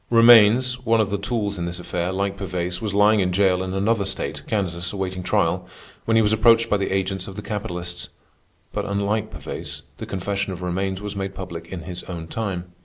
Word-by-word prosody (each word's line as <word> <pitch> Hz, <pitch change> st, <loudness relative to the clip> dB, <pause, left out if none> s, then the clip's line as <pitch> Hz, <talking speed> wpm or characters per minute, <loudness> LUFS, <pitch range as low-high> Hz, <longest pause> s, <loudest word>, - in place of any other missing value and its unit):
Romaines, 120 Hz, +2 st, +6 dB
one 115 Hz, -1 st, +3 dB
of 105 Hz, -3 st, +1 dB
the 100 Hz, -, +1 dB
tools 105 Hz, -2 st, -2 dB
in 85 Hz, -, -1 dB
this 85 Hz, 0 st, -4 dB
affair, 90 Hz, 0 st, -2 dB
like 100 Hz, +1 st, -1 dB
Pervaise, 90 Hz, -2 st, -3 dB
was 105 Hz, -, -2 dB
lying 105 Hz, +2 st, +5 dB
in 90 Hz, -2 st, +1 dB
jail 95 Hz, -1 st, +3 dB
in 95 Hz, 0 st, -3 dB
another 100 Hz, +2 st, +2 dB
state, 95 Hz, -, -3 dB
Kansas, 90 Hz, -4 st, -1 dB
awaiting 95 Hz, -2 st, -3 dB
trial, -, -, +1 dB, 0.4 s
when 115 Hz, -, +2 dB
he 115 Hz, -, +5 dB
was 105 Hz, +1 st, +3 dB
approached 115 Hz, +1 st, +5 dB
by 105 Hz, -, +4 dB
the 100 Hz, -, -1 dB
agents 95 Hz, -1 st, -1 dB
of 95 Hz, -, -8 dB
the 105 Hz, -, -6 dB
capitalists. 90 Hz, -5 st, -5 dB, 0.6 s
But, -, -, -2 dB
unlike 100 Hz, +2 st, 0 dB
Pervaise, -, -, -6 dB, 0.2 s
the -, -, -6 dB
confession 100 Hz, 0 st, -2 dB
of 90 Hz, 0 st, -7 dB
Romaines 95 Hz, +2 st, -2 dB
was 105 Hz, 0 st, -5 dB
made 95 Hz, 0 st, -4 dB
public 85 Hz, -3 st, -7 dB
in 90 Hz, -1 st, -6 dB
his 90 Hz, +1 st, -6 dB
own 85 Hz, -3 st, -6 dB
time. 90 Hz, -5 st, -3 dB
95 Hz, 205 wpm, -23 LUFS, 90-105 Hz, 0.6 s, Romaines